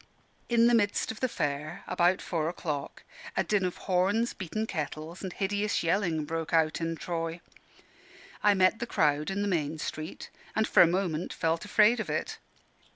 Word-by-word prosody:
In 235 Hz, -1 st, +4 dB
the 240 Hz, -, +5 dB
midst 205 Hz, -2 st, +2 dB
of 220 Hz, -, -9 dB
the 255 Hz, -, 0 dB
Fair, 150 Hz, -2 st, -3 dB
about 180 Hz, 0 st, +2 dB
four 160 Hz, -2 st, -1 dB
o'clock, 150 Hz, -5 st, -5 dB, 0.3 s
a -, -, +3 dB
din 210 Hz, -2 st, +1 dB
of 180 Hz, -, -3 dB
horns, 200 Hz, +6 st, +2 dB
beaten 210 Hz, +4 st, -3 dB
kettles, 160 Hz, -1 st, -5 dB
and 190 Hz, -, -4 dB
hideous 205 Hz, +2 st, -1 dB
yelling, 165 Hz, -3 st, +1 dB
broke 165 Hz, +1 st, -4 dB
out 160 Hz, 0 st, +2 dB
in 165 Hz, 0 st, -1 dB
Troy. 165 Hz, 0 st, -3 dB, 1.0 s
I 205 Hz, -1 st, +5 dB
met 185 Hz, +3 st, +3 dB
the 235 Hz, -, -3 dB
crowd 150 Hz, -6 st, +1 dB
in 195 Hz, +1 st, -1 dB
the -, -, 0 dB
main 160 Hz, -4 st, -1 dB
street, 155 Hz, +1 st, -6 dB, 0.2 s
and 220 Hz, 0 st, +2 dB
for -, -, +6 dB
a 175 Hz, -, +8 dB
moment 175 Hz, -2 st, -1 dB
felt 165 Hz, +3 st, -1 dB
afraid 215 Hz, +3 st, +4 dB
of 205 Hz, -7 st, -3 dB
it. 155 Hz, -, -3 dB
175 Hz, 175 wpm, -29 LUFS, 160-205 Hz, 1.0 s, a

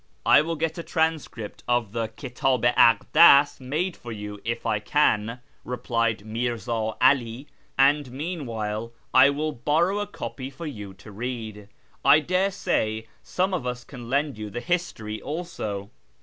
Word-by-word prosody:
" -, -, -41 dB
I -, -, +8 dB
will 165 Hz, +2 st, -2 dB
get 160 Hz, +1 st, -2 dB
a -, -, -2 dB
transcript 160 Hz, -, -2 dB
of 120 Hz, -4 st, +1 dB
the 115 Hz, 0 st, -2 dB
Kitdh 125 Hz, +2 st, -1 dB
i 120 Hz, -1 st, +6 dB
Akclas 145 Hz, +3 st, +6 dB
made 155 Hz, +8 st, -2 dB
for 120 Hz, -, -9 dB
you 105 Hz, -1 st, -7 dB
if 115 Hz, +1 st, -3 dB
I 105 Hz, -, +1 dB
can," 115 Hz, -1 st, +1 dB, 0.2 s
replied 115 Hz, -3 st, -1 dB
Mirza 115 Hz, -1 st, -2 dB
'Ali, 130 Hz, -1 st, +2 dB, 0.2 s
" -, -, -39 dB
and 140 Hz, 0 st, +4 dB
meanwhile 115 Hz, -8 st, -4 dB, 0.2 s
I 130 Hz, +2 st, +8 dB
will 150 Hz, +2 st, -1 dB
borrow 160 Hz, -, +1 dB
a 205 Hz, -, -2 dB
copy 135 Hz, -9 st, -6 dB
for 140 Hz, +5 st, -9 dB
you 105 Hz, -9 st, -7 dB
to 100 Hz, +3 st, -13 dB
read. 110 Hz, -2 st, -6 dB, 0.4 s
I 140 Hz, +3 st, +7 dB
daresay 175 Hz, -, 0 dB, 0.2 s
some 190 Hz, +1 st, -1 dB
of 140 Hz, -9 st, -2 dB
us 125 Hz, 0 st, -4 dB
can 120 Hz, -3 st, -10 dB
lend 140 Hz, -2 st, 0 dB
you 105 Hz, -1 st, -5 dB
the 120 Hz, -, -5 dB
History 120 Hz, -10 st, -3 dB
also. 110 Hz, -, -5 dB
125 Hz, 160 wpm, -25 LUFS, 110-150 Hz, 0.4 s, I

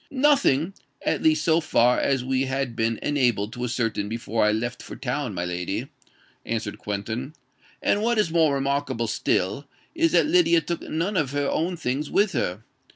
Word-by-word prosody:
"Nothing—at 260 Hz, -, +1 dB
least 315 Hz, -1 st, +3 dB
so 165 Hz, -1 st, +4 dB
far 125 Hz, -5 st, +3 dB
as 135 Hz, -3 st, +1 dB
we 130 Hz, +1 st, +1 dB
had 130 Hz, -2 st, -2 dB
been 115 Hz, -1 st, 0 dB
enabled 120 Hz, -7 st, +1 dB
to 125 Hz, -, -5 dB
ascertain 115 Hz, -4 st, -1 dB
before 115 Hz, -1 st, -1 dB
I 105 Hz, -, +4 dB
left 120 Hz, +3 st, -2 dB
for -, -, -9 dB
town, 125 Hz, -4 st, -3 dB
my 85 Hz, 0 st, -2 dB
lady," 90 Hz, 0 st, -3 dB, 0.5 s
answered 110 Hz, -2 st, -3 dB
Quentin. 110 Hz, +7 st, -4 dB, 0.5 s
"And 205 Hz, -, +2 dB
what 235 Hz, +1 st, +1 dB
is 210 Hz, -6 st, +2 dB
more 160 Hz, -4 st, +3 dB
remarkable 135 Hz, -3 st, -1 dB
still, 105 Hz, +3 st, -1 dB, 0.3 s
is 330 Hz, -1 st, +2 dB
that -, -, +5 dB
Lydia 315 Hz, -, +4 dB
took 170 Hz, 0 st, -4 dB
none 175 Hz, +6 st, -2 dB
of 145 Hz, -6 st, 0 dB
her 145 Hz, -1 st, 0 dB
own 175 Hz, +5 st, -1 dB
things 145 Hz, 0 st, -2 dB
with 205 Hz, 0 st, +2 dB
her. 95 Hz, -, -2 dB
135 Hz, 170 wpm, -25 LUFS, 115-165 Hz, 0.5 s, that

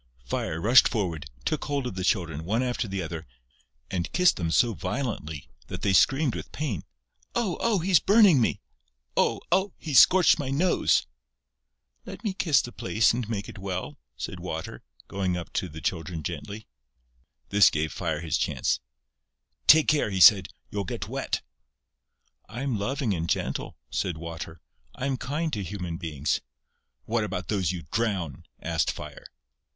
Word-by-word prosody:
Fire 80 Hz, +6 st, -2 dB
rushed 120 Hz, +8 st, +6 dB
forward, 85 Hz, -, -3 dB, 0.2 s
took -, -, -1 dB
hold 140 Hz, -2 st, -1 dB
of 125 Hz, -, -3 dB
the 95 Hz, 0 st, -4 dB
Children, 80 Hz, -6 st, 0 dB
one 110 Hz, +8 st, 0 dB
after 125 Hz, -2 st, -1 dB
the 95 Hz, -2 st, -3 dB
other, 85 Hz, -3 st, -6 dB, 0.6 s
and 90 Hz, -3 st, -2 dB
kissed 180 Hz, 0 st, +4 dB
them 85 Hz, -3 st, -1 dB
so 115 Hz, +7 st, +3 dB
violently 90 Hz, -, -4 dB, 0.2 s
that -, -, -7 dB
they 100 Hz, -, +2 dB
screamed 130 Hz, -, +4 dB
with -, -, -7 dB
pain: 135 Hz, -, -3 dB, 0.5 s
"Oh! 220 Hz, -7 st, 0 dB
Oh!... 230 Hz, -3 st, +2 dB
He's 180 Hz, -1 st, +4 dB
burning 200 Hz, -, +6 dB
me!..." 110 Hz, -, 0 dB, 0.5 s
"Oh! -, -, +2 dB
Oh!... 190 Hz, 0 st, +2 dB
He's 150 Hz, -5 st, +4 dB
scorched 180 Hz, -2 st, +6 dB
my 140 Hz, -2 st, -3 dB
nose!..." 165 Hz, -, +2 dB, 1.0 s
"Let -, -, -9 dB
me 210 Hz, -4 st, -1 dB
kiss 175 Hz, -8 st, +3 dB
the 120 Hz, -, -7 dB
place 115 Hz, -2 st, +2 dB
and 120 Hz, -2 st, -3 dB
make 100 Hz, -3 st, -3 dB
it -, -, -10 dB
well," 95 Hz, -7 st, -5 dB, 0.2 s
said -, -, -5 dB
Water, -, -, -5 dB, 0.3 s
going 95 Hz, -3 st, -1 dB
up 85 Hz, -, -7 dB
to 90 Hz, -, -1 dB
the 80 Hz, 0 st, -9 dB
children 85 Hz, -2 st, -3 dB
gently. 105 Hz, +8 st, -6 dB, 0.8 s
This 100 Hz, -3 st, +6 dB
gave 75 Hz, 0 st, -2 dB
Fire 80 Hz, -4 st, -2 dB
his 80 Hz, -2 st, -1 dB
chance: -, -, 0 dB, 0.9 s
"Take 155 Hz, 0 st, +8 dB
care," 150 Hz, -7 st, +3 dB
he 95 Hz, -2 st, -2 dB
said, 95 Hz, -1 st, +8 dB, 0.2 s
"you'll 100 Hz, -1 st, -2 dB
get 90 Hz, -, -5 dB
wet." -, -, -2 dB, 1.1 s
"I 120 Hz, +6 st, -5 dB
am 135 Hz, -4 st, -1 dB
loving 130 Hz, +1 st, -1 dB
and 85 Hz, -2 st, -3 dB
gentle," -, -, -2 dB
said 85 Hz, -4 st, -1 dB
Water. 80 Hz, -1 st, -7 dB, 0.3 s
"I 130 Hz, -, -4 dB
am 135 Hz, -1 st, 0 dB
kind 150 Hz, +6 st, -2 dB
to 105 Hz, -, -1 dB
human 90 Hz, -3 st, -5 dB
beings...." 75 Hz, -4 st, -2 dB, 0.6 s
"What 115 Hz, 0 st, 0 dB
about 90 Hz, -4 st, -4 dB
those 95 Hz, -5 st, +1 dB
you 90 Hz, -2 st, -5 dB
drown?" 95 Hz, -, -2 dB, 0.2 s
asked -, -, +1 dB
Fire. -, -, -9 dB
100 Hz, 165 wpm, -27 LUFS, 85-135 Hz, 1.1 s, Take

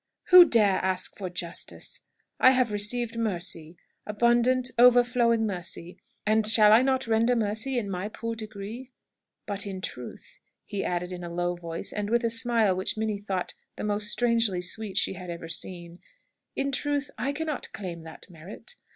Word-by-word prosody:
"Who 360 Hz, -1 st, +10 dB
dare 210 Hz, -, +3 dB
ask 185 Hz, -1 st, -1 dB
for 190 Hz, -3 st, -5 dB
justice? 175 Hz, -1 st, -5 dB, 0.4 s
I -, -, +7 dB
have 255 Hz, -3 st, +2 dB
received 230 Hz, +3 st, 0 dB
mercy 175 Hz, -6 st, -1 dB, 0.3 s
abundant, 240 Hz, +4 st, +2 dB
overflowing 245 Hz, -2 st, +5 dB
mercy 180 Hz, -3 st, -5 dB, 0.3 s
and 215 Hz, 0 st, +2 dB
shall 215 Hz, -1 st, +6 dB
I 225 Hz, -, +7 dB
not 260 Hz, 0 st, +1 dB
render 230 Hz, +2 st, +2 dB
mercy 225 Hz, +4 st, -1 dB
in 225 Hz, -4 st, -1 dB
my 190 Hz, +1 st, -4 dB
poor 230 Hz, +1 st, -5 dB
degree? 220 Hz, +3 st, -8 dB, 0.6 s
But 205 Hz, -1 st, -2 dB
in 190 Hz, -1 st, -5 dB
truth," 125 Hz, -9 st, -9 dB, 0.3 s
he 200 Hz, -, -4 dB
added, 180 Hz, 0 st, -2 dB
in 180 Hz, -1 st, -6 dB
a 170 Hz, -, -6 dB
low 175 Hz, +1 st, -1 dB
voice, 170 Hz, -1 st, -6 dB
and 210 Hz, 0 st, -3 dB
with 235 Hz, +1 st, +2 dB
a 230 Hz, -, +1 dB
smile 230 Hz, -4 st, +2 dB
which 185 Hz, +3 st, -2 dB
Minnie 215 Hz, -2 st, -2 dB
thought 195 Hz, -3 st, -3 dB, 0.2 s
the -, -, -6 dB
most 210 Hz, 0 st, -1 dB
strangely 230 Hz, -6 st, +1 dB
sweet 195 Hz, +2 st, -1 dB
she -, -, +2 dB
had 180 Hz, -1 st, -9 dB
ever 170 Hz, -1 st, -6 dB
seen 175 Hz, 0 st, -3 dB, 0.6 s
"in 275 Hz, 0 st, -1 dB
truth, 285 Hz, +1 st, -1 dB
I 265 Hz, +5 st, 0 dB
cannot 305 Hz, 0 st, -4 dB
claim 175 Hz, -5 st, -7 dB
that 160 Hz, 0 st, -12 dB
merit. 185 Hz, -, -10 dB
210 Hz, 170 wpm, -27 LUFS, 185-235 Hz, 0.6 s, Who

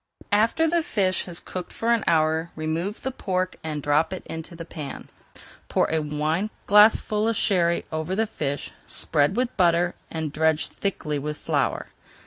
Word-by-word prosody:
After 225 Hz, +10 st, +3 dB
the 340 Hz, +1 st, +2 dB
fish 195 Hz, -, 0 dB
has 175 Hz, -2 st, -6 dB
cooked 185 Hz, -1 st, -6 dB
for 230 Hz, +1 st, +1 dB
an 230 Hz, -, +1 dB
hour, 160 Hz, 0 st, +2 dB
remove 160 Hz, +6 st, -3 dB
the 265 Hz, -, -1 dB
pork, 185 Hz, -6 st, -2 dB
and 150 Hz, -2 st, -4 dB
drop 145 Hz, +2 st, +2 dB
it 185 Hz, -, -7 dB
into 160 Hz, +2 st, -7 dB
the 165 Hz, 0 st, -7 dB
pan. 150 Hz, -4 st, -7 dB, 0.6 s
Pour -, -, +3 dB
a 160 Hz, -, +2 dB
wineglassful 205 Hz, +8 st, +3 dB
of 230 Hz, -, +1 dB
Sherry 170 Hz, -5 st, +2 dB
over 160 Hz, +3 st, -2 dB
the 220 Hz, +2 st, +2 dB
fish, 145 Hz, -10 st, -3 dB, 0.2 s
spread 150 Hz, +4 st, +1 dB
with 250 Hz, +1 st, 0 dB
butter, 175 Hz, -1 st, +3 dB, 0.2 s
and 160 Hz, -2 st, -4 dB
dredge 160 Hz, 0 st, +2 dB
thickly 155 Hz, -7 st, -2 dB
with 150 Hz, +2 st, -4 dB
flour. 140 Hz, -6 st, -1 dB
170 Hz, 160 wpm, -25 LUFS, 155-205 Hz, 0.6 s, After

